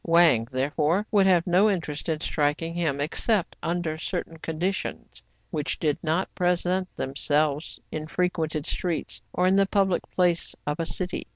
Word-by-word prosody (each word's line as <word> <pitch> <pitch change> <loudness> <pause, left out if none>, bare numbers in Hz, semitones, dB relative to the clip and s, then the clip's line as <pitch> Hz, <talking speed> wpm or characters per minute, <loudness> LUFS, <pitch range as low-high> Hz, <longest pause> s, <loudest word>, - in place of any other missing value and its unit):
Wang, 165 -9 +5
therefore, 150 +8 +1
would 200 -2 +5
have 175 -3 +4
no 185 +4 +4
interest 165 -5 -2
in 155 -1 0
striking 155 +2 0
him, 160 -5 -1
except 180 +6 0
under 165 -2 -2
certain 165 -1 -4
conditions, 170 +5 -3 0.3
which 150 -5 -2
did 150 -3 0
not 165 +4 -1
present 180 +1 +1
themselves 145 +2 0
in 155 0 -4
frequented 160 -3 -1
streets 170 -4 -2
or 180 - +1
in 190 +1 +4
the 195 0 +4
public 195 -3 +2
place 175 -2 +1
of 150 +3 -2
a 165 - 0
city. 180 -1 -3
170 Hz, 155 wpm, -26 LUFS, 155-180 Hz, 0.3 s, Wang